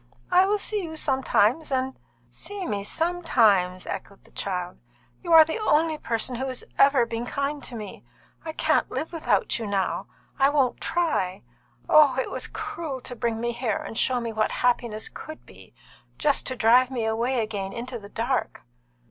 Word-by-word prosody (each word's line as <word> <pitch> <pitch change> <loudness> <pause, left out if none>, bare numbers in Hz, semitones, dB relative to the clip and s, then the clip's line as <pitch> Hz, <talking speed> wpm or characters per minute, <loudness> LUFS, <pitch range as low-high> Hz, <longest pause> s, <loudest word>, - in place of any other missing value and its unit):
"I 370 +1 +5
will 415 +1 +2
see 415 0 -2
you 320 -3 -6
sometimes, 265 -1 +1
and 260 0 0 0.2
" 120 0 -37 0.2
"See 405 -2 -5
me 205 -2 -2
sometimes!" 220 - +2
echoed 200 - -7
the - - -21
child. 180 -2 -4 0.4
"You 340 - -5
are 320 -1 +10
the 320 +8 -3
only 315 -6 +2
person 235 0 -1
who 265 +2 -2
has 255 -1 -5 0.2
ever 275 -3 +5
been 230 +1 -4
kind 280 +1 -2
to 245 - -7
me. 210 -3 -8 0.4
I 320 - -4
can't - - +1
live 320 - -4
without 330 - 0
you 225 - -4
now. 195 -2 -1 0.3
I 270 +1 +5
won't 275 -4 +1
try. 310 - -1 0.4
Oh, 290 -4 +6
it - - -2
was - - -2
cruel 340 -11 -5
to 245 - -5
bring 230 -1 -2
me 235 +1 -1
here 235 -3 -1
and - - -7
show 255 +2 +2
me 230 -1 -4
what 215 0 0
happiness 235 -3 0
could 315 0 -10
be, - - -16 0.4
just 290 -2 +1
to 255 - -2
drive 245 +2 +5
me 245 -4 -2
away 235 +3 0
again 205 -3 -3
into 240 +2 -6
the 200 -1 -12
dark!" 240 +5 -2
255 Hz, 180 wpm, -25 LUFS, 220-305 Hz, 0.4 s, are